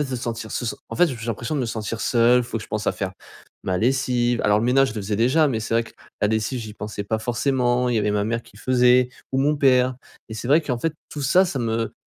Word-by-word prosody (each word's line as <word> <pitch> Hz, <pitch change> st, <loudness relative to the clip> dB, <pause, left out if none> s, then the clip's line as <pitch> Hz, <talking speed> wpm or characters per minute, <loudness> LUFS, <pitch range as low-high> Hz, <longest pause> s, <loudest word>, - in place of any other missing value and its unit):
en -, -, +1 dB
fait 135 Hz, -, -8 dB
se 130 Hz, -, -2 dB
sentir, 115 Hz, -2 st, -5 dB
se 120 Hz, -, -3 dB
sen -, -, -4 dB
en -, -, -5 dB
fait, 175 Hz, -, +5 dB
j 130 Hz, -, -5 dB
j'ai 115 Hz, -, -7 dB
l'impression 115 Hz, +5 st, -3 dB
de 145 Hz, -, 0 dB
me 120 Hz, -, -1 dB
sentir 110 Hz, 0 st, -4 dB
seul. 120 Hz, +1 st, +4 dB
Faut 115 Hz, -1 st, -4 dB
que 110 Hz, -, -8 dB
je -, -, -12 dB
pense 110 Hz, 0 st, -3 dB
à -, -, +2 dB
faire 95 Hz, -1 st, -4 dB, 0.5 s
ma 90 Hz, -1 st, 0 dB
lessive, 125 Hz, 0 st, +1 dB
alors 105 Hz, 0 st, +3 dB
le -, -, -1 dB
ménage 135 Hz, +2 st, +3 dB
je 110 Hz, -, -8 dB
le 105 Hz, -, -3 dB
faisais 105 Hz, +1 st, -2 dB
déjà, 140 Hz, +7 st, +3 dB
mais 115 Hz, -, -1 dB
c'est 115 Hz, +1 st, -3 dB
vrai 115 Hz, -, +3 dB
que -, -, -14 dB, 0.3 s
la 105 Hz, -, +2 dB
lessive 110 Hz, +4 st, -1 dB
j'y 105 Hz, -2 st, -8 dB
pensais 105 Hz, -1 st, -6 dB
pas 110 Hz, +2 st, -1 dB
forcément. 125 Hz, +1 st, 0 dB
Il 120 Hz, -, +1 dB
y -, -, +3 dB
avait 105 Hz, 0 st, +1 dB
ma 105 Hz, 0 st, 0 dB
mère 115 Hz, +1 st, -2 dB
qui 100 Hz, -, -19 dB
le -, -, -14 dB
faisait 125 Hz, 0 st, +4 dB, 0.2 s
ou 130 Hz, -, +1 dB
mon 145 Hz, +2 st, +2 dB
père. 130 Hz, -2 st, +3 dB, 0.3 s
Et 110 Hz, -, -7 dB
c'est 110 Hz, -, -6 dB
vrai, 155 Hz, +4 st, +5 dB
qu'en 125 Hz, -6 st, -2 dB
fait, 165 Hz, +4 st, -1 dB, 0.2 s
tout 145 Hz, -, -6 dB
ça, 180 Hz, +8 st, +4 dB
ça 145 Hz, -, -3 dB
me 115 Hz, -1 st, -1 dB
120 Hz, 300 wpm, -23 LUFS, 110-130 Hz, 0.5 s, fait